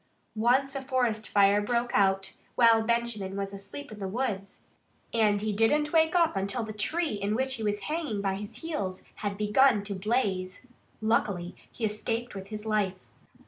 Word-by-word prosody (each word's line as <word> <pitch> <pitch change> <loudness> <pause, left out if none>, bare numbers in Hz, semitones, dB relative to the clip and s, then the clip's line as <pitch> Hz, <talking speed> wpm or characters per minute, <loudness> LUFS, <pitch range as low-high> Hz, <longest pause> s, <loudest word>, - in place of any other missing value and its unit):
Once 260 +5 +2
a 275 - -2
forest 250 -5 0
fire 200 0 +5
broke 240 +3 0
out 195 -1 +2 0.2
while 230 -2 +6
Benjamin 220 -4 -1
was 195 0 -3
asleep 200 +8 -8
in 215 - -9
the 195 - -3
woods. 200 -2 -3 0.5
And 210 -3 +3
he 215 -1 0
didn't 295 +9 +2
wake 320 +1 +4
up 335 - +3
until 200 +5 -1
the 220 -1 -6
tree 310 +8 -1
in 205 +1 -1
which 265 +2 0
he 230 -4 -4
was 205 -1 -1
hanging 300 -4 -2
by 195 -1 0
his 205 +9 -9
heels 200 - -3
had 200 -1 -3
begun 210 +1 +4
to 200 0 -4
blaze. 195 -1 -1 0.4
Luckily 200 -5 0 0.2
he 230 - -3
escaped 225 +3 -2
with 195 -1 -7
his 215 +1 -6
life. 210 -3 +1
215 Hz, 175 wpm, -28 LUFS, 200-245 Hz, 0.5 s, while